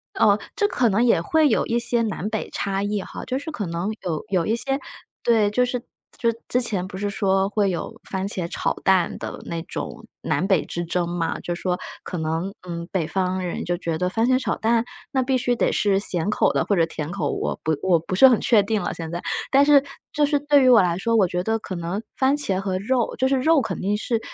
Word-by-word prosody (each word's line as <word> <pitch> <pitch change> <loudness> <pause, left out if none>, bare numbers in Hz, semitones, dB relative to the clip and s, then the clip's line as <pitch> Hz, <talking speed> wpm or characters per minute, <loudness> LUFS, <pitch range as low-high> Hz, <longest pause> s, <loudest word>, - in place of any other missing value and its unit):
哦， 205 - +4 0.2
这 410 - +2
可 250 - +2
能 210 +4 +2
也 230 -9 +4
会 310 - +3
有 - - +2
一 235 +1 0
些 240 0 +1
南 215 -2 -2
北 220 0 -3
差 195 0 -2
异 205 0 -1
哈， - - -8
就 260 +1 -2
是 285 +3 -7
可 225 -9 -4
能 170 +3 -3
有 160 -4 -3
有 180 -4 +1
一 220 - +1
些 270 +3 -1 0.4
对， 220 -3 +3
就 250 +4 +2
是 250 0 -1 0.4
就 235 - +1 0.2
之 250 - +2
前 200 -6 -1
不 190 0 -8
是 205 +1 -2
说 195 -1 +1
会 205 -1 +1
有 175 -3 -4
番 190 0 -3
茄 185 -3 -2
炒 - - -1
蛋 185 -3 +2
的 - - -7
那 165 -1 -4
种 - - -6 0.2
南 185 - 0
北 190 -4 +2
之 175 - -4
争 175 +1 -1
嘛。 170 -1 -2
就 175 - -4
是 - - -10
说 180 -1 -1 0.2
可 180 - -5
能， 165 +4 -2
嗯， 170 -1 -5
北 170 -5 -1
方 185 0 -1
人 180 -2 -3
就 175 0 -1
觉 165 -2 -2
得 180 +1 0
番 225 +4 +1
茄 255 0 +4
炒 260 - -1
蛋， 230 +1 +2 0.3
那 260 -1 +2
必 260 0 +1
须 245 0 +1
得 - - +1
是 200 -2 +2
咸 180 -2 -2
口 210 - +2
的 - - 0
或 205 - +1
者 165 -3 +3
甜 155 -1 -5
口， 170 -5 -2
我 - - -2
不 155 -1 0
我 180 -3 +4
不 170 - -7
是 265 +8 +8
很 245 -4 +4
确 220 -4 +5
定 210 +1 -1
了 - - -2
现 165 -1 -6
在。 175 - -4 0.3
但 275 +1 +5
是 290 -1 +6 0.3
就 295 - +2
是 290 0 +2
对 290 -1 +4
于 255 - +4
我 240 -4 +8
来 175 -1 +1
说， 230 +4 0
我 210 -4 +5
觉 180 0 -2
得 225 +3 0
可 195 - -7
能 175 +4 -3 0.2
番 270 0 +3
茄 195 -10 0
和 190 -1 -2
肉 240 +3 0
就 260 - +2
是 270 - +2
肉 310 +2 +4
肯 - - -4
定 200 +2 0
是， 230 +1 -1
200 Hz, 265 characters per minute, -23 LUFS, 180-240 Hz, 0.4 s, 是